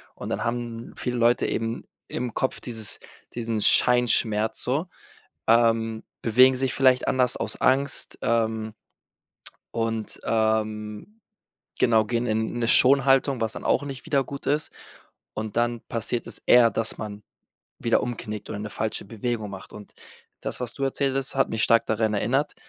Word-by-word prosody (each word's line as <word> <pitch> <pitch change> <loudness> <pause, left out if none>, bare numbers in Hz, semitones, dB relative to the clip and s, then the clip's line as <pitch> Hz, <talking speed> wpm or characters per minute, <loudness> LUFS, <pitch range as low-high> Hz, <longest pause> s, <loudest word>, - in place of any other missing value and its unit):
und - - -7
dann - - -2
haben 120 -1 -4
viele 125 -1 -2
Leute 120 +1 +3
eben 115 +1 -3 0.2
im 120 -2 -3
Kopf 130 - -1
dieses 110 -3 -2 0.4
diesen 115 -2 -2
Scheinschmerz 110 -3 +3
so. 145 +8 -1 0.6
Ähm, 115 -1 +3 0.2
bewegen 130 +3 +6
sich 130 -1 0
vielleicht 130 -2 +3
anders 125 -2 +2
aus - - -4
Angst, 135 +1 +1
ähm, 110 -1 0 1.0
und, 115 -1 -3
ähm, 110 - -1 0.6
genau, 110 -3 +4
gehen 120 +1 -1
in 110 +1 -1
'ne 115 - 0
Schonhaltung, 135 0 +4
was 110 -1 -1
dann - - -7
auch - - +2
nicht 140 0 -7
wieder 140 -4 +2
gut 140 -1 -8
ist. 150 +2 0 0.6
Und 110 0 -5
dann 120 0 +1
passiert 115 +1 -2
es - - -7
eher, 120 -1 +7
dass 115 - -2
man 105 -1 -7 0.6
wieder 115 - +2
umknickt 110 -3 -5
oder 105 - -4
'ne 105 0 -5
falsche 110 +1 -3
Bewegung 115 -1 -3
macht. 95 -1 -10
Und 105 -1 -11 0.5
das, - - -4
was 120 -2 -3
du 140 - -2
erzählt 135 0 0
hast, 135 -1 -2
hat 135 - +2
mich 110 -1 0
stark 115 0 +4
daran 110 -1 0
erinnert, 130 +8 0
115 Hz, 155 wpm, -25 LUFS, 110-130 Hz, 1.0 s, eher